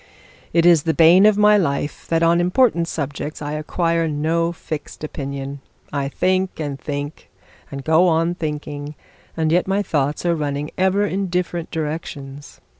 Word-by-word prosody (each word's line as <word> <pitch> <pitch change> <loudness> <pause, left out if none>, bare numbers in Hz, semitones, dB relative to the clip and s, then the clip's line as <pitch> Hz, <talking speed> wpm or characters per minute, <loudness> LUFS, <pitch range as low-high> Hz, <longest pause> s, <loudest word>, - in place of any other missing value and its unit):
'It 170 0 +3
is 170 -3 +6
the 160 +1 -1
bane 175 +5 +7
of 215 -1 +3
my 210 0 +6
life 145 -5 -2
that 165 0 +1
on 170 +1 +4
important 180 -2 +2
subjects 145 0 -4
I 145 -1 -4
acquire 165 +2 0
no 160 +3 0
fixed 155 -3 -7
opinion. 140 -1 -5 0.3
I 140 -1 -1
think, 185 +4 0
and 145 -3 -4
think, 145 +2 -6 0.4
and 140 -1 -7
go 160 +4 +4
on 165 +1 +2
thinking; 150 -3 -5 0.4
and 160 -1 +1
yet 180 +2 +2
my 195 +2 +1
thoughts 145 -2 -1
are 170 - +3
running 145 -1 -3
over 190 +2 +3
in 195 0 -2
different 175 -1 -2
directions. 150 -3 -6
160 Hz, 160 wpm, -21 LUFS, 145-175 Hz, 0.4 s, bane